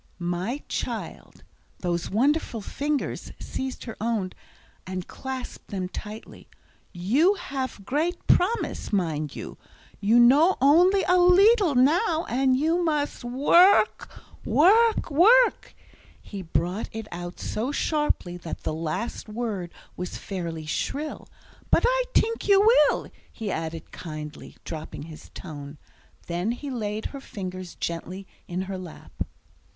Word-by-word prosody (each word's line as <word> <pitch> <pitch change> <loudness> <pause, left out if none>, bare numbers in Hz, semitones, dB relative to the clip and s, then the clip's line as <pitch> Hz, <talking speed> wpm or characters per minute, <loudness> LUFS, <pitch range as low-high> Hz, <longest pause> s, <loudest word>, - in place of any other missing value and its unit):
"My 180 +10 -3
child," - - -5 0.4
those 175 -1 -1
wonderful 260 +2 +1
fingers 290 +6 -3
seized 265 -1 -5
her 225 - -7
own, 215 -5 -1 0.6
and 185 -1 -4
clasped 265 -1 -7
them 185 -2 -4
tightly, 215 +3 -9 0.4
"you 260 - +3
have 265 - -5
great 320 - -1
promise, 435 +7 +1
mind 160 -7 -1
you, - - -8 0.4
you 215 +4 +4
know 285 +10 +6
only 350 +9 +5
a 360 0 +4
leedle 375 - +5
now, 320 - +3
and 260 +1 +2
you 325 +5 +1
must 300 -5 -1
work 295 - +4 0.3
work 435 +4 +4
work." 460 +12 +5 0.4
He 200 -2 -8
brought 180 +4 -2
it 220 -1 -6
out 175 0 -7
so 235 +6 -2
sharply, 295 - 0
that 170 -2 -7
the - - -2
last 165 +9 -4
word 210 -6 -3 0.2
was 180 0 -5
fairly 170 -5 -5
shrill. 290 - -3 0.4
"But - - +4
I - - +3
tink 455 -1 +1
you 400 -1 +6 0.3
will," - - -3 0.2
he 220 -4 -4
added 160 -1 -5
kindly, 155 -2 -8
dropping 155 -2 -7
his 160 0 -11
tone. 145 -4 -8 0.5
Then 175 +6 -1
he 275 +3 -6
laid 215 -3 -3
her 275 - -7
fingers 185 -7 -7
gently 180 +3 -5 0.2
in 180 +1 -3
her 190 0 -5
lap. 180 -4 -11
230 Hz, 125 wpm, -26 LUFS, -, 0.6 s, know